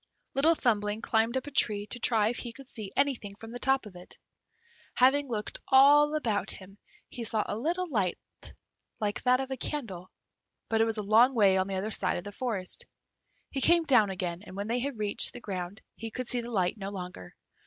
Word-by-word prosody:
Little 315 +5 +4
Thumbling 215 -4 0
climbed 225 +3 +1
up 260 - -3
a 290 - -8
tree 210 -6 +1
to 245 +3 -4
try 220 -2 +2
if 245 - -3
he 240 - -5
could 270 +3 -13
see 215 -6 -6
anything 255 -8 0
from 225 +2 -11
the 245 - -7
top 270 -1 +1
of 200 -3 -12
it. 180 0 -12 0.8
Having 275 +3 +4
looked 215 -3 -3
all 290 +3 +6
about 225 -9 0
him, 195 +1 -6 0.3
he 240 - -7
saw 220 -1 0
a - - -3
little 345 +10 -1
light 205 - 0 0.8
like 205 -1 -2
that 250 0 +3
of 270 0 -4
a 265 - -3
candle, 205 - -4 0.6
but 225 0 +2
it - - +5
was 225 -1 0
a 210 - -2
long 230 +6 +5
way 200 -4 +5
on 190 0 +1
the 195 - -3
other 200 +4 -3
side 185 -3 +1
of 175 - -6
the 205 - -7
forest. 205 -5 -2 0.6
He 270 - -2
came 340 +2 +5
down 250 -9 +4
again, 180 -2 -4
and 185 - -11
when 200 +3 -4
he 245 - +1
had 270 -1 -3
reached 210 -1 +2
the - - -8
ground 190 -1 -6
he 225 - -6
could 255 +2 -5
see 245 0 0
the 235 - -8
light 190 -2 0
no 195 0 -4
longer. 180 - -8
225 Hz, 215 wpm, -29 LUFS, 200-260 Hz, 0.8 s, all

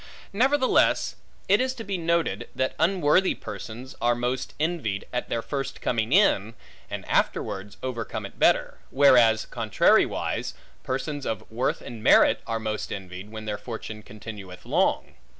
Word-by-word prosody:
Nevertheless 260 +5 +3 0.3
it 205 +4 +4
is 260 0 -1
to 230 - -7
be 200 -2 -3
noted, 170 -1 0
that 130 0 0
unworthy 180 +1 +3
persons 115 +4 -8
are 120 0 +3
most 125 +1 -3
envied, 150 - -1
at 125 - -2
their 115 - -1
first 135 +4 -4
coming 115 -1 -1
in, 115 - +3 0.3
and - - -6
afterwards 100 +1 -1
overcome 120 -3 -4
it - - -11
better; - - +3
whereas 120 -5 +5
contrariwise, 110 -4 +1 0.3
persons 140 +2 -3
of 110 - -3
worth 120 +4 -1
and 115 -2 -8
merit - - +5
are 115 0 -1
most 110 -1 -3
envied, 95 +1 -7
when 110 0 -8
their 105 -1 -3
fortune 110 -1 -7
continueth 105 -4 -10
long. - - +1
120 Hz, 145 wpm, -26 LUFS, 110-150 Hz, 0.3 s, whereas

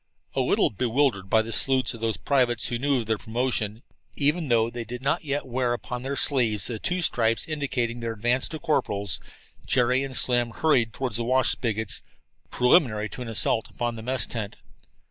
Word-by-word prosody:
A - - +1
little - - +2
bewildered 115 -3 0
by 110 +1 +4
the 115 - -7
salutes 130 +3 +2
of 115 - -10
those 115 -1 -1
privates 125 -5 +1
who 120 - -2
knew 140 -1 +1
of - - -7
their 110 -1 -1
promotions, 115 -2 -2 0.3
even 150 +3 +1
though 115 -2 +2
they 120 0 -5
did 125 +3 -8
not 140 - 0
yet 145 -1 -2
wear 125 -1 0
upon 120 +1 -5
their 135 +2 -3
sleeves 115 -10 +2
the 115 -3 -2
two 180 0 -1
stripes 115 -6 +1
indicating 130 -6 -2
their 115 -1 -3
advance 120 +4 +1
to 160 - -6
corporals, 100 - -1 0.5
Jerry 125 +1 +3
and 135 -1 0
Slim 120 -1 +3
hurried 125 -8 +2
toward 130 -3 -3
the 115 +2 -1
wash 130 +1 +2
spigots, 110 -3 -1 0.5
preliminary 125 -5 +3
to - - -8
an 125 - -5
assault 115 0 +2
upon 120 -1 -3
the 110 - -7
mess 125 0 0
tent. 105 -4 -5
120 Hz, 190 wpm, -25 LUFS, 115-130 Hz, 0.5 s, by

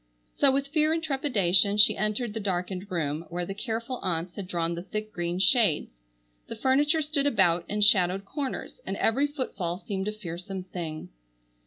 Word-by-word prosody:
So 280 -2 +4
with 275 +1 -1
fear 310 +1 +2
and 325 0 -1
trepidation 205 - +2
she 210 - +6
entered 215 +2 -1
the 225 - -3
darkened 185 0 -3
room, 160 -2 -2
where 175 +1 -3
the 195 - -5
careful 230 +4 -3
aunts 175 -1 -2
had 195 -3 -6
drawn 170 -2 -1
the 170 - -4
thick 215 +3 -5
green 175 0 -2
shades. 195 - +3 0.6
The - - -6
furniture 295 +4 +2
stood 290 -1 0
about 170 -10 +2
in 210 +1 -1
shadowed 195 -2 +4
corners, 285 - -5
and - - -4
every 270 +6 +2
footfall 200 - -3
seemed 195 -1 -4
a - - 0
fearsome 185 -1 -6
thing. 170 -4 -6
200 Hz, 175 wpm, -27 LUFS, 175-260 Hz, 0.6 s, she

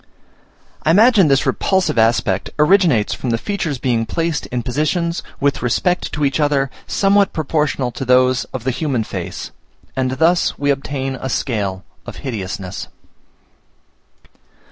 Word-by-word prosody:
I 155 - 0
imagine 205 +1 +6
this 135 -1 +3
repulsive 190 -10 +1
aspect 110 -4 +2
originates 150 - +3
from 130 - -4
the 115 - +1
features 170 - -3
being 120 -3 0
placed 165 +4 -2
in 125 -1 -3
positions, 160 +7 -1 0.2
with 140 0 +1
respect 175 +9 0
to 150 -2 0
each 135 0 0
other, 140 -3 +1 0.2
somewhat 200 0 +2
proportional 150 -4 -1
to 135 - -5
those 130 0 +3
of 130 -3 -7
the 130 - 0
human 130 -3 -1
face; - - -6 0.4
and 130 -1 0
thus 165 +6 +2
we 145 0 +1
obtain 135 -1 -3
a 130 - -3
scale 100 -8 -2 0.2
of - - -7
hideousness. 95 -5 -5
135 Hz, 140 wpm, -18 LUFS, 120-165 Hz, 0.4 s, imagine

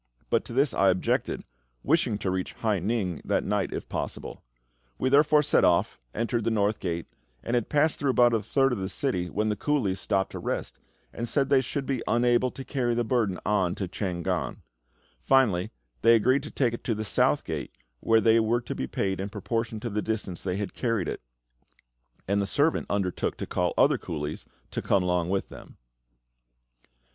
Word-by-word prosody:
But - - +3
to - - -8
this 135 +1 +2
I 100 - +4
objected, 95 0 0 0.4
wishing 135 -8 +2
to 95 - -2
reach 95 0 -3
Hai 110 -4 0
ning 95 -4 -1
that - - 0
night - - -1
if - - -5
possible.... - - -5 0.6
We 130 - +1
therefore 150 +2 +5
set 150 - +3
off, 85 -1 +2 0.2
entered 115 0 -1
the 115 - +1
North 105 -1 +1
Gate, 85 -2 -3 0.4
and 115 - -3
had 120 -3 +1
passed 150 +1 +2
through 140 - 0
about 120 -2 +4
a 115 - +2
third 135 +3 +2
of 120 - -1
the 95 0 -3
city, 90 -12 -1
when 105 +3 0
the 105 - 0
coolies 105 -6 0
stopped 95 0 0
to - - -6
rest, - - -4 0.3
and 120 0 -4
said 135 +2 +1
they 135 -2 +5
should 135 +2 -4
be 130 -4 -1
unable 120 +1 +3
to 135 +1 -9
carry 120 -4 0
the 120 - +1
burden 110 -6 0
on 95 -4 +1
to 95 - -3
Chang 90 -2 -3
gan. - - -2 0.6
Finally, 95 - +3 0.3
they 115 +1 +6
agreed 130 +5 +3
to 150 - -7
take 125 -4 0
it 120 - -6
to 115 - 0
the 110 - -3
South - - +2
Gate, - - -4 0.3
where 115 - +4
they 115 0 +5
were 115 +2 +1
to 120 - -5
be 65 - -3
paid 95 +5 -2
in 95 +1 -3
proportion 115 +1 -3
to 120 - -3
the 105 +1 -1
distance 105 -6 -3
they 95 -1 -2
had 100 -1 -4
carried 115 -9 -1
it; - - -4 1.1
and 100 +1 +2
the 100 - -1
servant 145 +9 +1
undertook 95 -3 -1
to - - -4
call - - 0
other - - +4
coolies 75 -1 -5 0.3
and - - -2
come 100 -2 +2
along 90 -1 0
with 95 0 -1
them. - - -13
110 Hz, 200 wpm, -27 LUFS, 95-125 Hz, 1.1 s, they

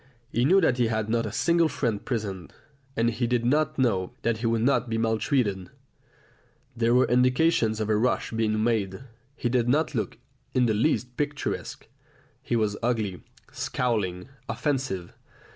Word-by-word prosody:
He 120 - +1
knew 190 +7 +5
that 130 -7 +2
he 120 - +3
had 110 -1 -1
not 115 0 +1
a - - -5
single 170 -1 +2
friend 115 -6 -2
present, 100 -7 -4 0.4
and 115 +1 +2
he 120 +2 -1
did 120 -1 0
not 155 +4 +1
know 100 -9 +1
that 115 -1 +1
he 115 +1 -2
would 115 0 +1
not 125 -2 +2
be 115 - -1
maltreated 110 - 0 1.1
there 120 0 +2
were 125 - +5
indications 125 -2 +2
of 110 - -1
a 110 - +2
rush 120 +4 0
being 110 -1 0
made. 110 -2 -1 0.3
He 125 - -2
did 120 -1 +1
not 155 +5 +2
look - - -2 0.4
in 125 -1 +4
the 110 - +2
least 125 +1 0
picturesque; 145 0 -3 0.6
he 120 - -2
was 105 -3 +1
ugly, 110 -7 -1 0.3
scowling, 105 -6 -2 0.2
offensive. 130 - -2
115 Hz, 160 wpm, -26 LUFS, 110-125 Hz, 1.1 s, knew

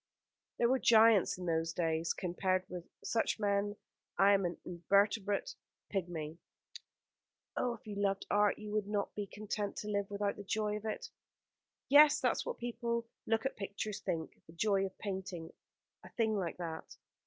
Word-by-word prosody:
"There 235 - +4
were 260 +2 +3
giants 225 -6 +6
in 180 - -6
those 165 -1 0
days. 165 -1 0
Compared 185 +1 0
with 175 -1 -7 0.2
such 225 -1 0
men 205 0 +1 0.4
I 195 +2 +6
am 195 -2 +3
an 175 - -2
invertebrate 200 - +1 0.4
pigmy." 170 -4 -3 1.2
"Oh, 245 - 0
if 225 - -19
you 210 - -6
loved 195 -1 0
art 205 0 +3
you 210 -1 -7
would 210 -1 0
not 205 -1 -1
be 205 -1 -4
content 205 0 -4
to 210 - -5
live 200 -1 -1
without 200 0 -1
the 205 - -7
joy 210 +1 -1
of 210 - -9
it." 215 - -4 0.8
"Yes, 295 +2 +8
that's 250 -3 0
what - - -3
people 240 0 -6 0.2
who - - -27 0.3
look 225 +1 +2
at 270 - -1
pictures 200 +1 -4
think 160 -2 -4
the 160 - -14
joy 195 +2 +2
of 190 - -14
painting 190 -4 -5 0.5
a - - -11
thing 220 -2 +1
like 180 -5 -2
that. 165 -2 -6
200 Hz, 170 wpm, -34 LUFS, 180-215 Hz, 1.2 s, Yes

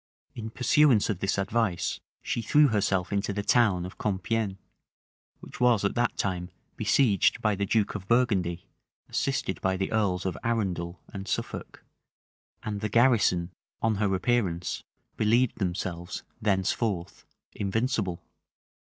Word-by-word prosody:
In 110 -1 -6
pursuance 125 -2 +4
of 95 - -4
this 100 +1 0
advice, 100 -2 0 0.2
she 115 - -1
threw 145 +6 +5
herself 100 -4 0
into 100 +1 0
the 100 +1 -3
town 100 -7 +3
of 90 - -10
Compiegne, 105 0 -1 0.8
which - - -11
was 120 -5 +4
at 100 - +1
that 120 0 0
time 90 -2 -2 0.3
besieged 110 -2 +3
by 105 -2 +1
the 100 0 -2
duke 105 0 +1
of 95 -2 -6
Burgundy, 100 -8 +1 0.4
assisted - - -1
by 95 0 +1
the 95 - -2
earls 100 -5 0
of 95 -3 -1
Arundel 95 -7 -1
and 95 0 -6
Suffolk; - - -4 0.8
and 105 -1 -4
the 105 - -1
garrison, 105 -7 +3 0.3
on 110 -2 +2
her 100 -2 +1
appearance, 95 -5 0 0.4
believed 115 +3 +2
themselves 90 -2 -3 0.2
thenceforth 95 -1 -1 0.3
invincible. 105 -3 -1
100 Hz, 135 wpm, -27 LUFS, 95-115 Hz, 0.8 s, threw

